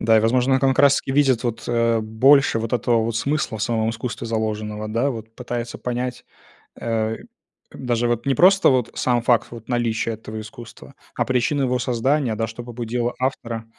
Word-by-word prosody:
Да, 110 0 +4
и, 110 - +5
возможно, 125 +4 +2
он 130 - +2
как 135 -1 +2
раз 140 -1 +6
таки - - -6
видит, 135 -4 +3
вот, 120 -2 -3
э, 115 -1 +2
больше 115 +4 +4
вот 115 0 -4
этого 120 -1 +2
вот 115 0 -2
смысла 140 -2 -1
в - - -3
самом 110 -1 0
искусстве 115 0 -5
заложенного, 110 -1 -3
да, 115 +6 0
вот 115 -2 -8
пытается 120 -1 -5
понять. 125 0 -4 0.6
Э, 110 -1 -1 0.6
даже 120 -2 -1
вот 120 +2 -1
не 135 - +1
просто 190 +5 +5
вот 125 -3 +1
сам 120 -2 +1
факт 120 -1 +2
вот 115 +1 -11
наличия 115 -2 0
этого 110 0 -7
искусства, 120 +2 -12 0.2
а - - +1
причину 135 +3 +1
его 125 -1 0
создания, 125 +1 0
да, 110 +1 -2
что 115 +2 -8
побудило 120 0 -3
автора. 115 -3 -3
120 Hz, 185 wpm, -22 LUFS, 110-125 Hz, 0.6 s, раз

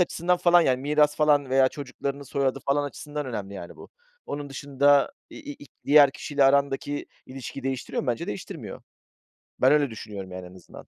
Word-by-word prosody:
açısından 180 0 +1
falan 175 0 +5
yani 130 -6 +2
miras 150 +1 +2
falan 145 -3 +3
veya 130 0 +4
çocuklarının 140 0 -6
soyadı 135 0 -1
falan 145 +1 +2
açısından 145 +1 -6
önemli 100 -5 -5
yani 85 -3 -9
bu. - - -13 0.4
Onun 145 0 -5
dışında 140 - +2 0.2
i - - -11 0.2
i - - -14
i - - -16 0.2
diğer 145 -1 +7
kişiyle 140 +1 0
arandaki 140 +1 +1 0.2
ilişkiyi 130 +1 -8
değiştiriyor 130 -1 -3
mu? - - -8
Bence 120 -2 -1
değiştirmiyor. 105 - -7 0.8
Ben 130 - +6
öyle 145 -2 +3
düşünüyorum 105 -4 -8
yani 90 0 -7
en 90 - -15
azından. 90 - -14
140 Hz, 175 wpm, -25 LUFS, 130-145 Hz, 0.8 s, diğer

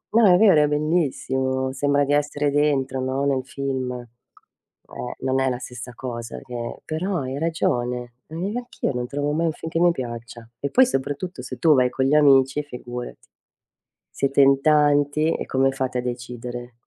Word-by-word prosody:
no, 230 - +6
è - - +6
vero, 195 -8 +6
è - - +3
bellissimo. 130 -4 0
Sembra 145 0 +2
di 145 - 0
essere 145 0 +1
dentro, 140 -3 +1
no, 130 +2 -1
nel 135 -2 +1
film. 130 -3 -4 0.9
Eh, 125 - -6
non 130 0 0
è 135 - +1
la 125 - -2
stessa 125 0 -8
cosa 120 -3 -6
che 120 -1 -6
però 175 +3 -2
hai 135 +1 -4
ragione. 125 -7 -1
Ma 160 - -10
neanche 235 +6 -5
io - - +1
non 125 0 -3
trovo 145 +2 -2
mai 165 +3 0
un 160 - +1
film 160 +1 -7
che 165 - 0
mi 175 0 +5
piaccia. 120 -4 -7
E 140 - -2
poi 260 0 +5
soprattutto 145 - -3
se - - -7
tu 160 -2 +5
vai 125 -1 +3
con 130 - -1
gli 140 - +2
amici 140 -1 +5
figurati, 125 -3 -7 0.9
siete 140 0 +1
in 135 0 +5
tanti 150 +1 +3
e - - -4
come 135 0 +2
fate 130 -2 -2
a - - -1
decidere? 120 0 -6
135 Hz, 180 wpm, -23 LUFS, 125-150 Hz, 0.9 s, no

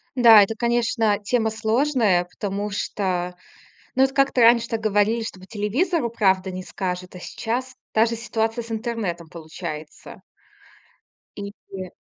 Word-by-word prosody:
Да, 230 -4 +8
это, 220 +3 -2
конечно, 230 -2 +1
тема 220 +2 0
сложная, 220 -4 +2
потому 200 +3 -4
что, 180 -3 -2 0.6
ну 260 - +3
вот 270 0 +3
как-то 275 -2 +2
раньше 235 0 +5
так 225 - -2
говорили, 215 +2 +2
что 220 -4 -6
по 185 - -13
телевизору 235 - 0
правду 190 -4 +2
не 185 0 -5
скажут, 180 -1 -5
а 180 - -9
сейчас 250 +7 -4 0.2
даже 230 +1 +3
ситуация 225 +1 -2
с 230 - -13
интернетом 215 -8 -3
получается. 160 -2 -8 1.2
И, - - -5 0.4
э 185 - -9
220 Hz, 140 wpm, -23 LUFS, 190-235 Hz, 1.2 s, Да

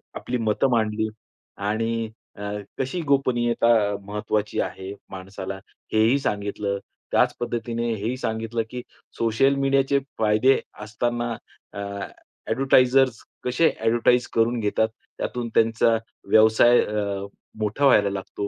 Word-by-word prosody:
आपली 125 - -3
मतं 110 +4 +1
मांडली 110 -2 +1 0.6
आणि 115 +1 -1 0.3
अ, - - -9 0.4
कशी 135 +7 -2
गोपनीयता 125 -6 +1 0.4
महत्त्वाची 105 +1 -2
आहे 95 +1 -5 0.2
माणसाला, 95 0 -6 0.4
हेही 110 +5 +4
सांगितलं. 100 -3 -2 0.3
त्याचं - - +3
पद्धतीने 120 0 -2
हेही 110 +4 -3
सांगितलं, 115 -1 -2
की 125 +1 -5 0.4
सोशल 115 +5 +2
मीडियाचे 135 0 +2 0.2
फायदे 110 +5 +4 0.2
असताना, 120 +3 -2 0.4
अ, - - -6 0.7
एडव्हर्टाइजर्स 130 0 +3 0.2
कसे 125 +7 +3
एडव्हर्टाइज 120 +1 +2
करून 115 +1 +2
घेतात. 110 +1 +1 0.3
त्यातून 120 -1 -3
त्यांचा 115 0 +3 0.3
व्यवसाय 110 +2 +6
अ, 100 -2 -2 0.3
मोठा 110 +7 0
व्हायला 105 -7 +5
लागतो. 100 +1 -4
115 Hz, 110 wpm, -24 LUFS, 105-125 Hz, 0.7 s, व्यवसाय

